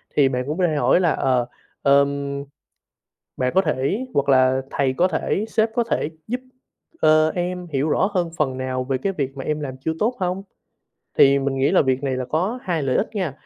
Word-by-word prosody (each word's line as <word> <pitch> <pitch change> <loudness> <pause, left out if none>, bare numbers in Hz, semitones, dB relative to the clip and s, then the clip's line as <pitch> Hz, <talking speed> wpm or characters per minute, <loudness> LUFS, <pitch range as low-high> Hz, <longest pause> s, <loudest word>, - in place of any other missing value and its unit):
thì 140 -2 +4
bạn 125 -1 -1
cũng 150 +3 -3
có 180 -2 +3
thể 155 - -1
hỏi 135 +3 +3
là, 175 -3 +2
ờ, 125 -2 +1 0.4
ừm, 140 0 +2 0.9
bạn 125 0 0
có 190 - +6
thể 190 - -1
hoặc 140 0 +1
là 130 0 +4
thầy 135 -2 0
có 175 +8 +2
thể, 185 +4 -1
sếp 220 0 +2
có 240 - +1
thể 150 - 0 0.2
giúp, 250 +3 -3 0.6
ờ, 155 0 +4
em 180 0 -3
hiểu 140 +2 0
rõ 185 +5 +2
hơn 175 -3 0
phần 135 -5 0
nào 130 0 -2
về 130 0 -1
cái 195 +9 -1
việc 135 -6 -3
mà 135 - -6
em 150 0 -2
làm 135 -3 -5
chưa 160 - 0
tốt 230 +6 +1
hông, 185 +1 -1 0.8
thì 140 0 +6
mình 135 0 -1
nghĩ 135 +2 +2
là - - +5
việc 130 -1 0
này 135 -2 -1
là 130 - -3
có 185 - -1
2 170 -6 -1
lợi 130 -2 0
ích 215 - 0
nghe, 185 -8 -1
140 Hz, 220 wpm, -22 LUFS, 135-180 Hz, 0.9 s, có